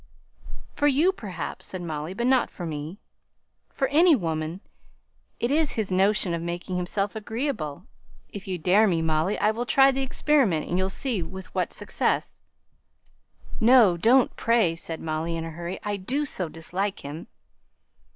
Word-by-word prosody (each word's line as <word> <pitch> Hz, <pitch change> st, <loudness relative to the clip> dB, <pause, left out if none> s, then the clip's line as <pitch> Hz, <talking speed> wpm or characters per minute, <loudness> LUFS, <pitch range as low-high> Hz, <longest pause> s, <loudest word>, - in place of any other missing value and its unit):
"For 290 Hz, -, +1 dB
you, 295 Hz, +7 st, +4 dB
perhaps," 205 Hz, -, -6 dB
said 185 Hz, -2 st, -5 dB
Molly; 160 Hz, +2 st, -5 dB
"but 235 Hz, +3 st, -1 dB
not 255 Hz, -1 st, +3 dB
for 175 Hz, -, -7 dB
me." 155 Hz, +3 st, -5 dB, 0.7 s
"For 270 Hz, -, -1 dB
any 325 Hz, +3 st, +6 dB
woman. 165 Hz, -, -3 dB, 0.8 s
It's 290 Hz, +5 st, +1 dB
his 215 Hz, -4 st, -2 dB
notion 190 Hz, -1 st, +2 dB
of 170 Hz, -, -2 dB
making 175 Hz, +2 st, -4 dB
himself 195 Hz, +3 st, -2 dB
agreeable. 220 Hz, -, -4 dB, 0.4 s
If 200 Hz, -1 st, -9 dB
you 185 Hz, -1 st, -2 dB
dare 190 Hz, +6 st, +4 dB
me, 165 Hz, -4 st, +1 dB
Molly, 160 Hz, +5 st, +1 dB
I'll 220 Hz, +3 st, +1 dB
try 270 Hz, +3 st, +5 dB
the 270 Hz, 0 st, -2 dB
experiment, 265 Hz, -, +1 dB
and 175 Hz, -, 0 dB
you'll 190 Hz, 0 st, 0 dB
see 230 Hz, 0 st, -2 dB
with 190 Hz, +3 st, -8 dB
what -, -, -1 dB
success." -, -, -1 dB, 1.2 s
"No, 230 Hz, -6 st, +6 dB
don't, 235 Hz, +9 st, +3 dB
pray!" 230 Hz, -8 st, +2 dB
said 165 Hz, -1 st, -4 dB
Molly, 160 Hz, +1 st, -2 dB
in 165 Hz, -, -4 dB
a 165 Hz, -, -6 dB
hurry. 170 Hz, +3 st, -6 dB
"I 205 Hz, -1 st, -2 dB
do 265 Hz, +10 st, -2 dB
so 185 Hz, -, -3 dB
dislike 185 Hz, +5 st, -3 dB
him!" 145 Hz, +4 st, -8 dB
190 Hz, 155 wpm, -25 LUFS, 170-240 Hz, 1.2 s, any